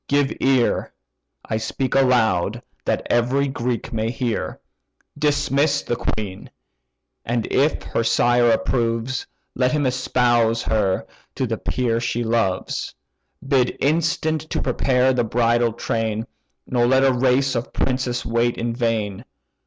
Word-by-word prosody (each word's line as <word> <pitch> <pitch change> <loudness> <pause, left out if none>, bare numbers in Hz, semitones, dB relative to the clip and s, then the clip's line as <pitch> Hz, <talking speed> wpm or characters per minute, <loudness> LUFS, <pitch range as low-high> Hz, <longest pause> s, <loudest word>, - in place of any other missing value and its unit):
give 145 -1 +2
ear 130 -3 +2 0.5
(I 110 - -2
speak 130 +4 -2
aloud, 120 -9 +2 0.2
that - - -1
every 125 +4 +2
Greek 125 -2 -3
may 110 0 -1
hear): 120 -2 -3 0.6
Dismiss 145 0 +1
the 120 - -1
queen; 105 -5 -4 0.7
and 115 -1 -1
if 145 +4 +2
her 115 - -1
sire 120 +1 +3
approves 115 +2 0 0.3
Let 125 0 +1
him 150 -2 +1
espouse 120 -2 +2
her 100 -4 0 0.3
to - - -1
the - - -2
peer 120 -2 0
she 120 0 -1
loves: 110 -5 -1 0.5
Bid 130 -3 +2
instant 160 +1 +1
to - - -1
prepare 130 0 +2
the 125 -1 +1
bridal 120 +1 +2
train, 110 0 -2 0.4
Nor 120 -1 +1
let 130 +1 +4
a 135 -1 +4
race 130 +2 +2
of 120 0 -3
princes 125 -2 -1
wait 115 +1 +1
in 115 0 -2
vain. 110 -4 -1
120 Hz, 130 wpm, -22 LUFS, 115-130 Hz, 0.7 s, let